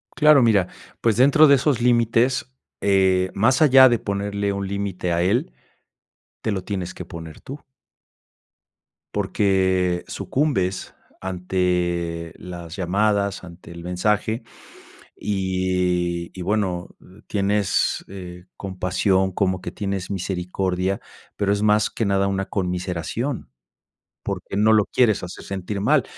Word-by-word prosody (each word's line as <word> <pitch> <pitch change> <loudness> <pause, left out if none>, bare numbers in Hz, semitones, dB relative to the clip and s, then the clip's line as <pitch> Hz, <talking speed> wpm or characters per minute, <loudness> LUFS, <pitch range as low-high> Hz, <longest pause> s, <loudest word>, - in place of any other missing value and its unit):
Claro, 150 -3 +6
mira, 105 -6 +3 0.3
pues 115 -3 +2
dentro 140 +5 +6
de 140 - +7
esos 135 -2 +1
límites, 120 +2 +2 0.3
eh, 95 -2 +3
más 130 +8 +2
allá 130 -3 +8
de 120 - +2
ponerle 100 0 -2
un 100 0 -3
límite 95 -3 -2
a 85 - +1
él, 95 - +1 0.9
te 110 - -1
lo 95 -2 -2
tienes 95 -3 -4
que 90 - -8
poner 80 -2 -9
tú. 140 +3 -8 1.6
Porque 95 -3 +1
sucumbes 110 -11 -1 0.3
ante 90 -2 -1
las 85 -2 -8
llamadas, 100 +1 0
ante 85 -1 -12
el 85 0 -9
mensaje, 105 +5 0 0.8
y 90 -3 -1
y - - -4
bueno 95 -2 -1 0.4
tienes, 100 -2 0
eh, 90 -2 -9
compasión, 95 0 0
como 95 0 0
que - - -5
tienes 100 -2 -4
misericordia, 95 0 -2 0.4
pero 100 -1 +1
es 105 +1 0
más 105 0 +3
que 115 - -2
nada 100 -1 +2
una 95 0 -1
conmiseración, 90 - -3 0.7
porque - - -5
no 110 +2 +4
lo 105 -2 +4
quieres 110 -4 +2
hacer 90 0 -8
sentir 100 +1 -4
mal, - - +3
95 Hz, 125 wpm, -22 LUFS, 90-105 Hz, 1.6 s, allá